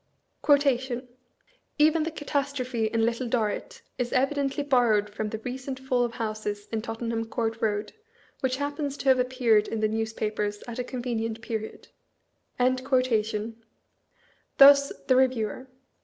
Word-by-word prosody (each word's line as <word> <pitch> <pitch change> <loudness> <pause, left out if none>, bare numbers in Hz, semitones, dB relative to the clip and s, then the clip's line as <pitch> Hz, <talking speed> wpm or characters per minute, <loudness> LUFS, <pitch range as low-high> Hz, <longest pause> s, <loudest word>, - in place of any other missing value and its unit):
"Even 310 +2 +4
the 320 - -1
catastrophe 280 -6 -2
in 225 0 +1
'Little 235 +2 -1
Dorrit' 245 - -2 0.2
is 245 -1 -1
evidently 275 +2 0
borrowed 235 -7 +2
from 210 +1 -3
the 220 - -4
recent 260 +3 -6
fall 260 -2 +1
of 235 -1 -2
houses 215 -2 -4
in 225 -1 -1
Tottenham 225 0 -3
Court 225 0 -3
Road, 210 -1 -1 0.5
which 260 -1 0
happens 285 0 -3
to - - -7
have 260 -1 +5
appeared 250 -4 +2
in 225 - -3
the 215 - +2
newspapers 215 -1 -2
at 240 0 -6
a - - 0
convenient 235 -3 -3
period." 220 -2 -5 0.7
Thus, 255 +1 +2 2.2
the 260 - +4
Eeviewer. 255 -2 +1
240 Hz, 125 wpm, -27 LUFS, 220-260 Hz, 2.2 s, have